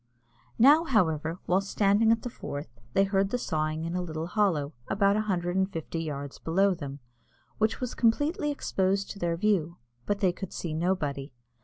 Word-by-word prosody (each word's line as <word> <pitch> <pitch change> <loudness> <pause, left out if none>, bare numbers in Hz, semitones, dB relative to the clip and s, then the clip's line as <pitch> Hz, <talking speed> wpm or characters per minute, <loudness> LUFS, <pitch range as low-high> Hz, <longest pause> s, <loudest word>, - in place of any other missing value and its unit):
Now, 290 +7 +7
however, 165 - +1
while 185 +2 +2
standing 205 +2 +3
on 230 0 +2
the 245 - -4
Forth, 145 - -7
they 195 - +4
heard 195 0 +1
the 250 - 0
sawing 155 -6 -2
in 165 +2 -3
a 180 - 0
little 160 -2 -4
hollow, 170 -7 0
about 200 0 +3
a 215 - +2
hundred 180 -4 -1
and 190 +1 +1
fifty 165 -1 -4
yards 140 -3 -5
below 195 +4 +2
them, 140 -5 -6 0.6
which 220 0 +1
was 250 -2 -3
completely 290 +6 +1
exposed 195 -8 0
to 200 - -9
their 170 -2 0
view, 175 -4 +1 0.3
but 205 - +1
they 190 -3 +3
could 190 0 -7
see 165 -3 -4
nobody. 155 -5 -1
185 Hz, 180 wpm, -28 LUFS, 160-210 Hz, 0.6 s, Now